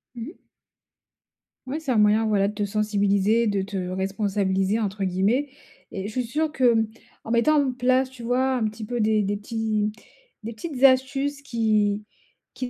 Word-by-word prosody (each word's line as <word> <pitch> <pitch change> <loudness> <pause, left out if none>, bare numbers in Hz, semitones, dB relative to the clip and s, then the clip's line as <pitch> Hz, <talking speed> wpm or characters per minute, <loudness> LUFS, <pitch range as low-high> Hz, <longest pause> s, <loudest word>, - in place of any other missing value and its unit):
Mmh. 240 +9 -8 1.3
Ouais, 295 +5 -3
c'est 280 -5 -2
un 240 - +2
moyen, 210 +1 +4
voilà, 205 -2 +2
te 210 0 -3
sensibiliser, 205 +1 +1
de 200 -2 0
te 200 +1 -6
responsabiliser, 195 +1 0
entre 205 -2 -2
guillemets, 200 +10 +1 0.4
et 195 0 -5
je 215 - -6
suis 250 +1 -1
sûr 305 +7 -1
que, 250 -5 +3
mmh, 225 -1 +2 0.4
en 225 - -5
mettant 285 +6 +4
en 260 -2 -1
place, 255 +1 +2
tu 255 -2 -12
vois, 255 +2 +1
un 245 - -1
petit 215 0 -8
peu 240 +1 -2
des 215 0 +2
des 205 0 -1
petits 215 0 -2 0.5
des 230 +2 -5
petites 265 +3 -7
astuces, 275 +2 +2
qui 215 -5 0 0.5
qui 255 -1 -5
220 Hz, 170 wpm, -24 LUFS, 205-255 Hz, 1.3 s, moyen